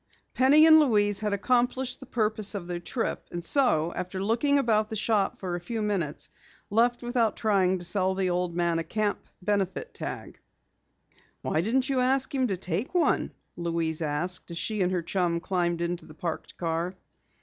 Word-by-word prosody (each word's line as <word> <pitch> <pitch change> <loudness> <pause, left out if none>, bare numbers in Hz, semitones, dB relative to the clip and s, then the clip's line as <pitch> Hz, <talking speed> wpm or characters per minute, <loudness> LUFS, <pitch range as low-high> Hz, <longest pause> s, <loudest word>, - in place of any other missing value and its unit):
Penny 285 +5 +6
and 315 -1 +8
Louise 205 -8 +3
had 210 -1 -2
accomplished 250 +4 0
the 265 - -12
purpose 215 -3 +1
of 190 -4 -4
their 175 0 -4
trip, 225 +7 -3
and 175 0 -5
so, 170 - +2
after 185 +1 -4
looking 235 +8 +2
about 220 -5 +2
the 220 - -4
shop 210 -1 0
for 185 -2 -5
a - - -3
few 225 +6 -4
minutes, 185 -8 -2 0.4
left 240 +3 +2
without 240 -2 +1
trying 190 -4 +2
to 175 - -3
sell 190 +1 +2
the 190 -1 0
old 175 -1 -1
man 170 -1 +1
a - - -2
camp 210 +2 -1 0.2
benefit 205 - -1
tag. - - -7 1.0
"Why 155 - 0
didn't 250 +7 0
you 270 -2 0
ask 260 +2 +1
him 260 -2 +1
to 195 -4 -2
take 185 - -3
one?" 350 - +2 0.2
Louise 165 -2 -1
asked 160 +5 -2
as 170 - -6
she 210 +5 -2
and 180 0 +1
her 180 -2 -1
chum 170 -1 0
climbed 175 -1 -1
into 170 0 -3
the 155 - -13
parked 165 0 -5
car. 170 +2 -2
195 Hz, 180 wpm, -27 LUFS, 175-235 Hz, 1.0 s, and